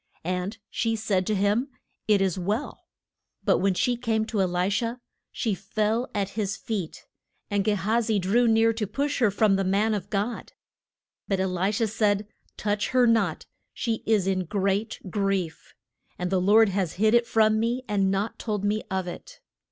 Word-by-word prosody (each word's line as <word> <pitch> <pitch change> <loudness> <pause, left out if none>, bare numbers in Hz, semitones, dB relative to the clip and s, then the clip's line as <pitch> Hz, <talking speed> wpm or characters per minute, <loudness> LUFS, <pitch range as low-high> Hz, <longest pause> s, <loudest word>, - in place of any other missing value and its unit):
And 185 +4 -2
she 225 -1 0
said 200 -4 0
to 215 - +1
him, 205 +6 +1 0.4
It 210 -2 +4
is 190 -3 0
well. 205 +9 -3 0.6
But - - +3
when 190 0 +1
she 245 +6 +1
came 225 -2 0
to 220 -3 -1
E - - +3
li 180 0 0
sha 230 +4 -1 0.4
she 220 - -1
fell 215 +5 -1
at 200 -2 0
his 205 0 -3
feet, 200 -8 -5 0.5
and 205 -1 +1
Ge 210 - +2
ha 215 +4 +1
zi 220 -2 0
drew 210 +6 +2
near 225 0 +4
to 220 -2 -3
push 280 +8 -2
her 235 -5 +4
from 200 0 +3
the 195 - 0
man 200 +4 +2
of 200 -2 -4
God. 215 +3 -3 0.7
But 195 -2 0
E 190 - +1
li 185 +1 0
sha 220 +2 +1
said, 210 -1 +1 0.3
Touch 205 -1 -1
her 255 -1 +4
not. 230 -1 +1 0.3
She 225 -3 -2
is 215 -4 +3
in 190 -1 0
great 200 +4 -1
grief, 195 -5 -2 0.4
and 180 0 -3
the 185 -1 +2
Lord 210 +3 +5
has 190 -4 -1
hid 215 +3 +2
it 235 0 +4
from 220 -1 +3
me 240 +3 -1
and 195 -2 +1
not 195 +3 -2
told 210 -3 -2
me 210 +1 +1
of 190 -1 -1
it. - - -9
210 Hz, 190 wpm, -26 LUFS, 195-225 Hz, 0.7 s, Lord